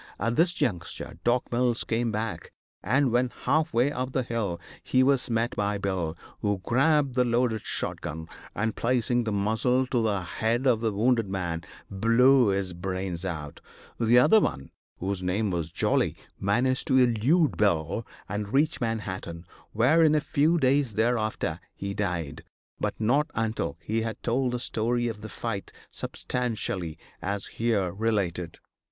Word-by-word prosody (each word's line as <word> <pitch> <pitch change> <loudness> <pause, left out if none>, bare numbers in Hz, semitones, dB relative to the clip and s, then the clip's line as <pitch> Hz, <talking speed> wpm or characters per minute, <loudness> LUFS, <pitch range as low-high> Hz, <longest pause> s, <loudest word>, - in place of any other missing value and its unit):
At 115 0 0
this 170 +4 +3
juncture 90 - -3
Doc. 120 +1 +1
Mills 120 -1 +1
came 115 0 0
back, 110 +1 -4 0.3
and, 130 +2 +2
when 125 +1 +2
half 155 +1 +2
way 125 +5 +2
up 130 -2 -3
the 130 - +1
hill, 110 -8 -2 0.2
he 130 - +3
was 135 -1 +2
met 115 +1 0
by 105 0 0
Bill, 90 -5 -2 0.2
who 105 -1 0
grabbed 140 +2 +2
the 125 0 +3
loaded 120 -2 +1
shot - - -3
gun, 80 +2 -6 0.3
and, 110 +1 -1
placing 120 0 +1
the 110 - -1
muzzle 110 +6 +1
to 125 -2 0
the 105 -4 0
head 115 +7 -1
of 120 -4 +3
the 115 -2 +1
wounded 115 0 +1
man, 85 -4 -2 0.3
blew 120 +5 +5
his 95 -2 0
brains 95 0 -3
out. 75 -5 -5 0.4
The 115 +1 +4
other 215 - +7
one, 70 - -2 0.3
whose 95 +1 -2
name 95 +3 0
was 85 -2 -2
Jolly, - - +1 0.2
managed 125 +6 +2
to 130 - +4
elude 130 +7 +3
Bill 90 0 +1 0.2
and 105 +1 -4
reach 145 +3 +2
Manhattan, 95 -7 -4 0.3
where, 130 +9 +4
in 155 -1 +5
a - - +4
few 150 +3 +2
days 135 -5 +2
thereafter, 110 -7 0 0.2
he 100 0 -4
died, 85 -8 -3 0.4
but - - -2
not 135 +8 +2
until 110 -9 -2
he 110 +5 -1
had 110 0 -5
told 125 +1 0
the 125 - -1
story 120 +1 0
of 110 -3 -5
the 110 - -7
fight 110 -4 -4 0.2
substantially 110 -9 -3 0.2
as 100 +1 -2
here 110 -6 0
related. 95 -5 -1
115 Hz, 160 wpm, -27 LUFS, 100-125 Hz, 0.4 s, other